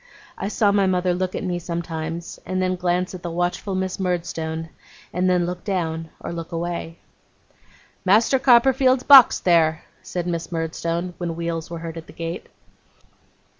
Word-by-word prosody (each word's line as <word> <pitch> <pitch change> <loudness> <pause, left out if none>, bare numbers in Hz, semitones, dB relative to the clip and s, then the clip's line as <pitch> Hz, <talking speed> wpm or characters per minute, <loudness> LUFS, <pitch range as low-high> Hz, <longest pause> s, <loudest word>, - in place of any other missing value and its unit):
I - - -4
saw 205 0 +2
my 200 -1 +3
mother 180 -1 +1
look 185 +1 -2
at - - -3
me 180 -2 -2
sometimes, 170 -1 -5
and 185 0 -3
then 185 0 +1
glance 180 +1 -1
at 185 - -7
the 175 - -4
watchful 175 +3 -2
Miss 185 0 -2
Murdstone, 165 -3 -3 0.4
and 185 +1 +1
than 180 -1 +2
look 180 0 -5
down, 165 -5 -2
or - - -6
look 165 -1 -6
away. 170 0 -4 1.1
'Master 220 +7 +4
Copperfield's 260 0 +4
box 275 -4 +8
there!' 160 -2 +3 0.2
said 175 -1 -4
Miss 170 -1 -3
Murdstone, 170 +2 -2
when 170 -2 -3
wheels 170 -1 -3
were 170 - -5
heard 165 0 -7
at 165 +1 -9
the - - -13
gate. 165 +1 -5
175 Hz, 165 wpm, -22 LUFS, 165-185 Hz, 1.1 s, box